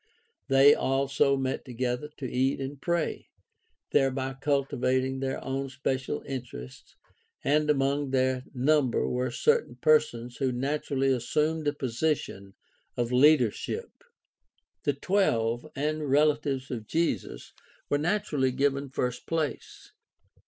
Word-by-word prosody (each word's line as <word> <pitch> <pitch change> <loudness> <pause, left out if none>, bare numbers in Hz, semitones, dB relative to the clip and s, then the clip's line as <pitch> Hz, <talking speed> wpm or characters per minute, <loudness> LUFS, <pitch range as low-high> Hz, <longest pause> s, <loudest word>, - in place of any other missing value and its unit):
They 135 +1 +7
also 140 +1 +1
met 130 0 -2
together 125 +2 -3
to 135 - -6
eat 130 +3 0
and 135 +1 -6
pray, 170 -2 -1 0.6
thereby 135 -1 +1
cultivating 130 -2 0
their 135 0 -2
own 135 +1 -2
special 130 0 -2
interests, 120 - -8 0.5
and 150 +2 +2
among 140 0 +1
their 130 -1 +1
number 135 0 +2
were 125 +1 -1
certain 460 0 +1
persons 125 - +2
who 130 -2 0
naturally 135 +1 0
assumed 150 +5 0
a 145 - +2
position 125 -7 -2 0.4
of 120 0 -1
leadership. 125 -3 +3 0.9
The 145 - +2
"Twelve" 120 - 0
and 150 +1 -2
relatives 145 -2 +1
of 110 -4 -5
Jesus 165 +6 -2 0.3
were 145 - +1
naturally 150 -6 0
given 140 +1 0
first 125 -2 -3
place. 160 -3 -3
135 Hz, 115 wpm, -28 LUFS, 130-150 Hz, 0.9 s, They